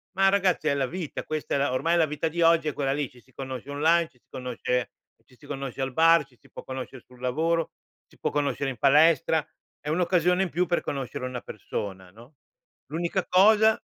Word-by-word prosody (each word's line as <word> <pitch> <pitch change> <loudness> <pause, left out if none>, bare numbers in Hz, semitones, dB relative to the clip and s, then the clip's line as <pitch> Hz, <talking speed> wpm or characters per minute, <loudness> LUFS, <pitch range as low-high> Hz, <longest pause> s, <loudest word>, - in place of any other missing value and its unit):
Ma, 195 0 +4
ragazzi, 190 -5 +1
è 140 - +3
la 135 -2 +1
vita. 170 -1 -5
Questa 155 -1 -3
è - - +2
la 140 -2 0
ormai, 165 +6 +1
la 165 - +4
vita 150 +1 -2
di 170 +2 -3
oggi 165 -1 +4
è - - -5
quella 135 -1 -1
lì. 145 -3 -2
Ci 125 - -19
si 130 +2 -26
conosce 130 0 -7
online, 165 +3 +3
ci 125 - -30
si - - -48
conosce 125 0 -3 0.3
ci 125 - -22
si - - -17
conosce 135 -2 -5
al 135 - -1
bar, 165 +3 +5
ci 125 -3 -27
si - - -23
può - - -9
conoscere 130 -1 -7
sul 125 -1 -19
lavoro, 160 +6 0 0.3
si - - -24
può - - -1
conoscere 140 -1 -1
in 130 - -6
palestra. 155 +4 +4 0.3
È 150 - -6
un'occasione 180 +2 +2
in 180 - -2
più 180 +3 0
per 175 - +1
conoscere 135 -2 -4
una 125 -1 -5
persona, 95 -3 -6
no, 120 +8 -17 0.5
l'unica 170 +5 -2
cosa 215 +3 +5
150 Hz, 215 wpm, -26 LUFS, 130-170 Hz, 0.5 s, bar